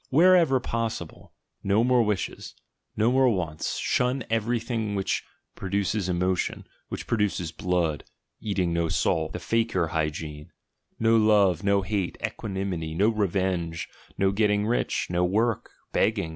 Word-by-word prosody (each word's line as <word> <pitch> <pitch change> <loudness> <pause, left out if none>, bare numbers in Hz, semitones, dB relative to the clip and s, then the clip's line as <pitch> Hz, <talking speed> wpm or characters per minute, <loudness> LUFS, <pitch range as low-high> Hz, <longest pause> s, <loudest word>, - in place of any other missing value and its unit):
Wherever 165 -2 +5
possible, 115 -2 -4 0.3
no 100 +3 +3
more 125 0 +4
wishes, 105 -3 -2 0.4
no 110 +3 +3
more 130 0 +4
wants; 85 -7 -2
shun 125 +1 0
everything 115 -1 -1
which 95 -1 -1 0.3
produces 100 0 -1
emotion, 90 0 -1 0.2
which - - -5
produces 100 -7 0
"blood" 85 -2 -1 0.4
(eating 95 -5 -1
no 85 -1 0
salt, - - 0
the - - -4
fakir 115 -7 0
hygiene); 75 -1 -3 0.5
no 115 0 +3
love; 105 -5 +4
no 100 0 +2
hate; 95 -2 -2
equanimity; 95 -6 -4
no 100 +6 +3
re 105 -3 +1
venge; 90 -3 -2 0.3
no 95 0 +2
getting 105 0 +2
rich; 120 +3 0
no 90 0 +1
work; 110 +5 0 0.2
begging! 100 -6 +1
100 Hz, 130 wpm, -26 LUFS, 90-115 Hz, 0.5 s, Wherever